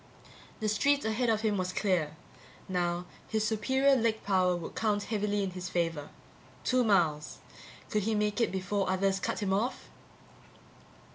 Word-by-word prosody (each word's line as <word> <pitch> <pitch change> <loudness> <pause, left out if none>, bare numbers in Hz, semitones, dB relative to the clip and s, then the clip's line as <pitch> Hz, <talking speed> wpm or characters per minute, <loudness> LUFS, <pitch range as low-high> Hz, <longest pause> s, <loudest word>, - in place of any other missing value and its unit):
The 215 - 0
street 280 +7 +2
ahead 225 +2 +1
of 220 -1 +2
him 215 -2 +1
was 185 -1 -1
clear. 180 -6 0 0.5
Now 175 -1 -1 0.2
his 220 -1 0
superior 265 +6 +3
leg 225 -3 0
power 185 -2 +2
would 170 -2 -6
count 210 -2 0
heavily 205 -2 -1
in 190 - -2
his 180 0 -6
favor. 165 -5 -1 0.5
Two 255 -1 +3
miles. 165 -8 +1 0.5
Could 210 - +2
he 220 +2 0
make 210 +2 0
it - - +4
back - - -7
before 190 +1 -1
others 190 +1 +1
cut 200 - -2
him 190 -1 +1
off? 225 +6 -2
205 Hz, 160 wpm, -30 LUFS, 185-220 Hz, 0.5 s, it